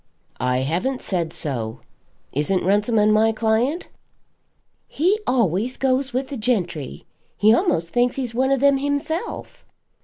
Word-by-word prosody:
"I 125 0 0
haven't 180 - -2
said 170 -4 -2
so. 115 -5 -3 0.5
Isn't 165 +7 0
Runciman 210 +3 +3
my 220 +1 +4
client?" 225 +9 0 1.0
"He 370 +8 +1
always 235 0 +1
goes 265 0 0
with 260 +2 -2
the 280 - -5
gentry. 180 - -2 0.3
He 210 +2 +5
a'most 200 - +1
thinks 245 +5 +1
he's 250 -4 -3
one 260 +3 +1
of 270 -2 +2
them 280 -1 +4
himself." 285 +8 -3
225 Hz, 130 wpm, -22 LUFS, 180-270 Hz, 1.0 s, He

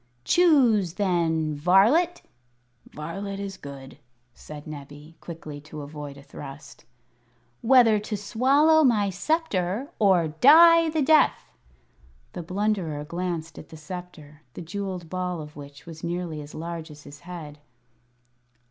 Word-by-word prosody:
"Choose, 245 - +3
then, 165 -5 0
varlet 205 - +3 0.3
" 125 0 -43
("Varlet 195 +6 -6
is 200 -1 -5
good," 140 -4 -11 0.3
said 150 +2 -11
Nebbie, 145 +1 -11
quickly, 155 -4 -9
to 150 0 -9
avoid 145 -1 -8
a 140 - -13
thrust) 135 -3 -11 0.8
"whether 230 -3 +5
to 210 0 -4
swallow 275 +10 +3
my 210 -7 +2
sceptre 230 - -1
or 185 -6 +3
die 330 - +6
the 310 -2 0
death!" 305 - +3 0.8
The 175 - -5
Blunderer 180 -4 -2
glanced 170 -1 -5
at - - -13
the 160 - -11
sceptre, 155 -2 -10
the - - -7
jewelled 185 -1 -5
ball 180 0 -3
of 150 0 -10
which 145 0 -12
was 160 -2 -11
nearly 170 -2 -4
as 145 0 -11
large 165 0 -6
as 150 -1 -13
his 145 0 -13
head. 160 -3 -9
175 Hz, 130 wpm, -25 LUFS, 150-210 Hz, 0.8 s, die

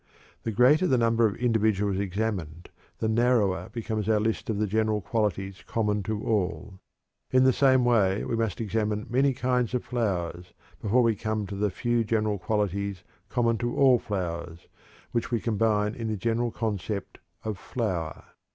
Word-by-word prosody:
The 115 - -3
greater 135 - +4
the 130 - +3
number 115 -1 +3
of 100 - -4
individuals 105 -5 +1
examined, 95 -5 -3 0.3
the 110 - -1
narrower 110 -6 +2
becomes 110 -2 -3
our 110 -1 +4
list 110 +2 -1
of 110 - 0
the 105 - +1
general 110 +1 +1
qualities 95 -1 -2
common 105 -2 0
to 110 -1 -2
all. 100 -2 -1 0.5
In 130 0 +4
the 130 0 +5
same 130 -2 +4
way 105 -5 +2
we - - -1
must 115 -5 -1
examine 105 -1 -1
many 135 +3 +3
kinds 125 -1 0
of 125 - -1
flowers 90 -7 -2 0.3
before 120 +4 +3
we 115 -2 +3
come 110 0 -2
to 100 - -6
the 105 +1 0
few 120 +3 0
general 105 -2 0
qualities 100 -2 -1 0.3
common 115 -2 +1
to 120 0 -2
all 130 -3 +5
flowers, 85 -4 -4 0.4
which 115 - -1
we 120 -1 0
combine 105 -2 +1
in 115 -1 -5
the 110 -1 -2
general 115 +3 0
concept 105 -3 -4 0.2
of 110 -3 -4
"flower." 90 -10 -3
110 Hz, 165 wpm, -27 LUFS, 100-115 Hz, 0.5 s, the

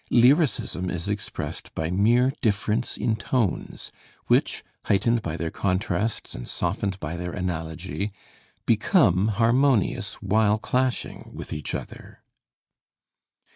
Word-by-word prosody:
Lyricism 125 - +3
is 85 0 -3
expressed 100 0 -5
by 80 +1 -2
mere 120 +7 +3
difference 110 +1 0
in 110 - +1
tones, 115 -4 -2 0.3
which, - - +2 0.2
heightened 115 +4 +2
by 85 -4 -4
their 85 -2 -3
contrasts 100 +2 -1
and - - -7
softened 100 -2 -2
by 75 +1 -4
their 90 0 -4
analogy, 90 +2 -3 0.5
become 90 +4 +4
harmonious 115 +2 +2
while 105 +2 +2
clashing 125 +3 -1
with - - -6
each 75 -1 -3
other. - - -9
100 Hz, 110 wpm, -25 LUFS, 90-115 Hz, 0.5 s, become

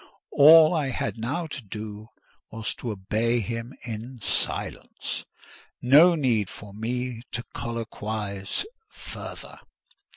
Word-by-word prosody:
All 155 +3 +8
I 155 -5 +1
had 120 -2 -3
now 140 +10 -2
to 145 -4 -6
do 105 0 -7 0.4
was 110 0 -4
to 120 - -6
obey 110 +4 0
him 115 +3 -4
in 120 +2 -6
silence: 100 - -2 0.5
no 155 +8 +7
need 120 - +1
for 105 -1 -11
me 120 +2 -3
to 115 - -2
colloquise 110 - -3 0.2
further. - - -9
115 Hz, 110 wpm, -26 LUFS, 110-130 Hz, 0.5 s, All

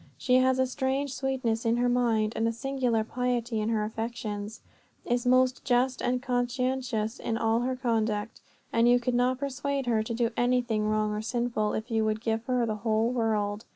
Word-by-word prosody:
She 250 -1 +3
has 260 0 +3
a 260 - +3
strange 265 +1 -1
sweetness 260 -5 -1
in 230 0 +2
her 245 +1 +2
mind, 230 -3 +1
and 225 +1 +1
a - - +1
singular 245 -2 0
piety 240 -1 -1
in 215 - -1
her 220 -2 +1
affections; 220 -1 -5 0.4
is 245 0 0
most 255 0 +3
just 255 0 +1
and 250 0 0
conscientious 250 -2 -1
in 225 - -2
all 225 0 +2
her 255 +2 -1
conduct; 225 -3 -1 0.3
and 230 +1 +4
you 245 0 +5
could 245 +1 -1
not 250 +1 +2
persuade 280 0 -2
her 230 -3 +2
to 225 +2 -4
do 235 0 +1
anything 245 -3 +1
wrong 215 0 +1
or 210 - -2
sinful, 235 -2 -1
if 220 +3 -4
you 225 -1 +2
would 215 0 0
give 225 0 -1
her 250 -1 +1
the 215 -2 -2
whole 220 +1 +1
world. 215 -3 -1
240 Hz, 190 wpm, -28 LUFS, 220-250 Hz, 0.4 s, you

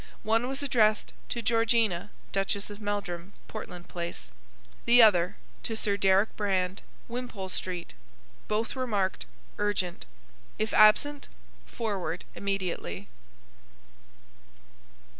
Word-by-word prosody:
One 225 +3 +2
was 270 +2 -1
addressed 215 -6 +3 0.2
to 235 - -2
Georgina, 225 -5 +2 0.2
Duchess 200 +1 -1
of 205 +1 -9
Meldrum 200 -3 -3
Portland 180 -5 -7
Place 170 - -5 0.5
The 240 +1 +7
other, 180 -5 +5 0.2
to 225 - -3
Sir 205 -2 +1
Deryck 195 +1 +3
Brand 190 -2 0 0.3
Wimpole 235 -6 -5
Street 180 -1 -4 0.5
Both 215 +2 0
were 255 -1 -2
marked: 200 -4 0 0.3
Urgent. 195 - -1 0.5
If 215 0 -1
absent, 275 +7 +5 0.4
forward 200 -6 -3
immediately. 185 - -3
205 Hz, 105 wpm, -29 LUFS, 185-225 Hz, 0.5 s, The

